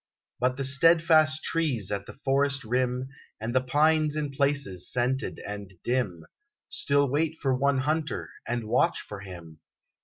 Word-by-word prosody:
But 125 +1 +1
the 135 - -2
steadfast 155 +2 +4
trees 135 - -1
at 100 -1 -3
the - - -11
forest 140 +1 +2
rim, 125 +2 -1 0.3
And 115 +2 -4
the 130 - +3
pines 150 +3 +2
in 150 -2 -2
places 140 -10 0
scented 125 +2 -1
and 100 -2 -7
dim, 105 -10 -1 0.4
Still 140 0 +2
wait 155 +4 0
for 135 -2 +1
one 140 +1 +2
hunter, 150 +3 -2 0.2
and 120 0 -2
watch - - +2
for 105 - -8
him. 85 -5 -10
130 Hz, 150 wpm, -27 LUFS, 115-145 Hz, 0.4 s, steadfast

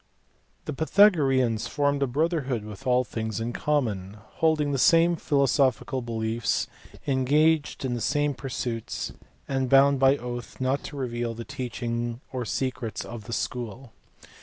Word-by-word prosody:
The - - -3
Pythagoreans 140 - +3
formed 145 -1 0
a 140 - +2
brotherhood 135 -4 -1
with 105 +5 -9
all 125 0 +4
things 110 -3 -4
in 115 +2 -3
common, 110 -11 -1 0.3
holding 155 -3 +3
the 135 - 0
same 165 +4 +5
philosophical 135 -4 +1
beliefs, 115 -1 -1 0.4
engaged 145 +3 +2
in 125 - -1
the 120 - -3
same 145 +3 +1
pursuits, 125 -4 -4 0.3
and 135 -2 -1
bound 135 +1 +5
by 135 +1 +5
oath 120 -1 -7
not 130 +2 0
to 145 - -7
reveal 120 -3 -3
the 115 0 -7
teaching 120 -1 -3
or 125 -2 -2
secrets 125 0 -3
of 115 -3 -8
the 115 - -6
school. 115 +5 -4
130 Hz, 140 wpm, -26 LUFS, 115-140 Hz, 0.4 s, same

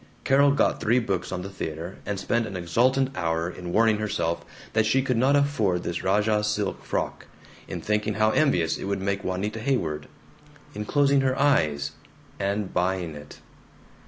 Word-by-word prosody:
Carol 140 +1 +5
got 140 - +2
three 115 +3 +3
books 95 -7 -1
on 90 -1 -3
the 100 - -6
theater, 85 0 -6
and 100 -2 -2
spent 115 +3 0
an 100 -3 -5
exultant 130 +10 +1
hour 80 -1 -1
in 90 0 -6
warning 110 +2 +3
herself 85 -5 -1 0.3
that 110 0 +3
she 130 +4 +3
could 130 -2 0
not 130 +5 +3
afford 110 -12 +1
this 85 - -3
rajah 105 +2 +2
silk 105 -1 -1
frock, - - -3 0.4
in - - -5
thinking 105 0 0
how 110 +1 +3
envious 90 - +2
it - - -5
would 100 0 -1
make 100 +1 -2
Juanita 100 +4 -2
Haydock, 85 - -1 0.7
in 105 +1 -5
closing 140 +2 +3
her 130 0 +1
eyes, 75 - +2 0.5
and 100 0 -1
buying 90 -2 0
it. 75 0 -11
105 Hz, 170 wpm, -25 LUFS, 90-120 Hz, 0.7 s, Carol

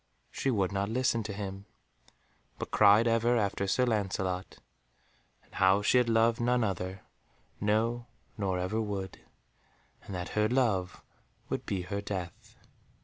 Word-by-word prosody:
She 135 - -1
would 100 -7 +1
not 100 +1 -1
listen 120 0 +1
to 105 -1 -5
him, 100 -1 -6 0.9
but - - -6
cried 105 +2 +6
ever 115 +1 +3
after 100 -2 0
Sir 125 +6 +2
Lancelot, 95 -5 -2 0.9
and - - -27
how 95 +2 +3
she 125 - +4
had 120 -1 +1
loved 115 +1 +3
none 120 0 +2
other, 95 -1 -3 0.6
no, 115 +3 0 0.3
nor 95 -4 -1
ever 95 +5 -1
would, 100 -3 -4 0.8
and 100 - -8
that 90 0 -4
her 105 0 +1
love 110 -8 0 0.5
would - - -3
be 95 -3 -2
her 100 +3 -4
death. 95 -4 -6
105 Hz, 145 wpm, -30 LUFS, 95-115 Hz, 0.9 s, cried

